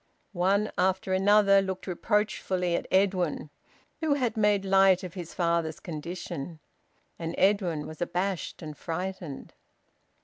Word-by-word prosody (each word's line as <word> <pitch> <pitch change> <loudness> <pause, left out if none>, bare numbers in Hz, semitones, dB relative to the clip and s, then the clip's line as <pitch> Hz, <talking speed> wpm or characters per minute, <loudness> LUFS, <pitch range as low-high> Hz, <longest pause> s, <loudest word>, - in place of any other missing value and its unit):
One 195 +4 +1
after 190 +1 +1
another 195 +1 +5
looked 190 -1 -4
reproachfully 185 -2 0
at - - -3
Edwin, 185 -6 +1 0.5
who 315 -3 +1
had 250 -5 -1
made 210 -2 +2
light 195 -1 +5
of 180 -2 -6
his 175 -3 -8
father's 170 -2 0
condition. 170 -1 -6 0.6
And 165 0 -4
Edwin 185 -6 +2
was 155 +1 -10
abashed 180 0 -2
and 155 -1 -7
frightened. 175 -2 -5
185 Hz, 125 wpm, -28 LUFS, 170-195 Hz, 0.6 s, another